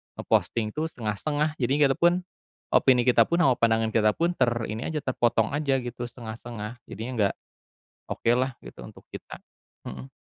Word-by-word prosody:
nge-posting 110 -2 0
tuh 155 +7 -2
setengah-setengah 150 +6 -2
jadi 130 0 +1 0.2
kita 135 - +2
pun 175 +1 +3 0.5
opini 125 -2 +5
kita 125 0 +5
pun, 170 +1 +1
sama 135 - +5
pandangan 115 -1 +2
kita 105 -1 +3
pun 170 +1 +1
ter 125 - +3 0.2
ini 110 +2 -4
aja 155 -2 -3
terpotong 120 -4 +1
aja 145 -1 +1
gitu 120 0 -5
setengah-setengah, 115 -1 -8
jadinya 110 +5 -6
nggak 100 -2 +2 0.8
okelah 125 +2 +1
gitu - - -12
untuk - - -15
kita. - - -8 0.5
Mhm. 65 +1 -8
120 Hz, 160 wpm, -26 LUFS, 110-140 Hz, 0.8 s, opini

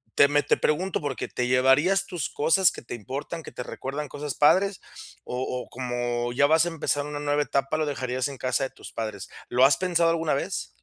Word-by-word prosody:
Te 140 - +7
me 145 0 +2
te - - +2
pregunto 180 +5 0
por 145 -3 -3
qué, - - -5
¿te 125 - -2
llevarías 135 +10 +3
tus 175 -9 -4
cosas, 165 +4 +3
que - - -9
te - - -8
importan, 135 +8 -5
que - - -11
te 125 - -5
recuerdan 140 +4 -5
cosas 145 -1 -5
padres? 190 +6 +3 0.4
O 125 - -4 0.3
o - - -24
como 120 -1 -2
ya 140 +3 +4
vas 160 +3 +4
a - - -1
empezar 150 -3 -1
una 150 0 -5
nueva 145 0 +1
etapa, 140 +1 -1
lo 155 - 0
dejarías 130 -2 -2
en 140 -1 -8
casa 130 +2 0
de - - -5
tus - - -12
padres. 110 -4 -5 0.2
¿Lo 125 +1 +3
has 135 +1 +6
pensado 170 -2 +2
alguna 165 -2 +1
vez? 170 +7 -2
145 Hz, 220 wpm, -26 LUFS, 130-160 Hz, 0.4 s, Te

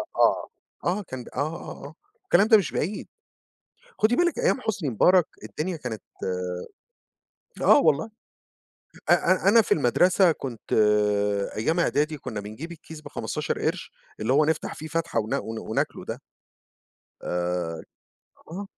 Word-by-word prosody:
آه، - - +3 0.4
آه 185 +4 +1
كان 130 -8 -7
ب - - -12
آه، - - -14
آه، 155 -1 -4
آه. 145 - -12 0.3
الكلام 210 - +4
ده 220 -2 +8
مش 195 - -1
بعيد، 195 +7 -3 0.9
خُدي 225 +3 +3
بالِك 345 - +2
أيام 485 - +2
حسني 190 - -2
مبارك 180 - +4 0.2
الدنيا 170 +3 -3
كانت 115 -7 -6 1.6
آه - - +7
والله، 160 - +2 1.0
أ - - +8
أ 185 +1 +3
أنا 225 +3 +7
في - - -1
المدرسة 175 +7 +4
كنت 125 -7 -8 0.8
أيام 160 +11 +1
إعدادي، 150 -1 +1
كنّا 120 -6 -5
بنجيب 110 +12 -8
الكيس 160 -1 -11
ب15 - - -3
قرش، - - -2 0.3
اللي 110 +4 +1
هو 150 +3 +5
نفتح 160 0 -1
فيه 155 - -8
فتحة 165 -6 -1
ونا 110 +1 -1
ون 110 0 -5
وناكله 110 - -2
ده. - - -5 1.0
آآ، 90 -2 -2 0.7
آه، 195 +4 -5
155 Hz, 140 wpm, -25 LUFS, 120-185 Hz, 1.6 s, ده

